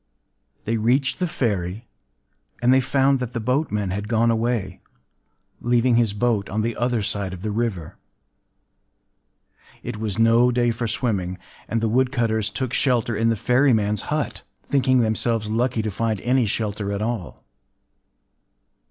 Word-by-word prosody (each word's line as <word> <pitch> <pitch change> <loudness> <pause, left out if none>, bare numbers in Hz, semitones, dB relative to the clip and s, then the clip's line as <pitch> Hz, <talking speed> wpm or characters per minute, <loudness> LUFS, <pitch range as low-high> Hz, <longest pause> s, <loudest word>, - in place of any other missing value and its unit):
They 115 +1 0
reached 130 +5 +1
the 180 - 0
ferry; 105 - -2 0.7
and 125 +1 +4
they 130 - +5
found 135 +1 +2
that 125 -1 -4
the 120 - -2
boatman 110 -5 -1
had 100 +2 -3
gone 115 +1 +2
away, 115 -5 -1 0.8
leaving 120 0 +2
his 115 -3 +3
boat 105 -2 0
on 110 +2 -1
the 115 0 -2
other 120 -3 0
side 100 -2 -3
of 90 0 -9
the 110 - -2
river. 105 -7 -3 1.9
It - - -5
was 105 -3 -3
no 115 +2 +5
day 120 -1 +2
for 115 +1 -3
swimming; 105 -6 -2 0.3
and 115 0 -1
the 115 - +1
woodcutters 115 -3 +1
took 125 +4 -3
shelter 120 -4 +1
in 115 +2 +2
the 115 - +2
ferryman’s 110 -3 +2
hut,—thinking 135 -3 0
themselves 110 -1 +1
lucky 120 0 0
to 110 - -2
find 110 0 -1
any 125 -1 +2
shelter 105 -1 -2
at 100 +1 -2
all. 110 -6 -4
115 Hz, 145 wpm, -23 LUFS, 105-125 Hz, 1.9 s, they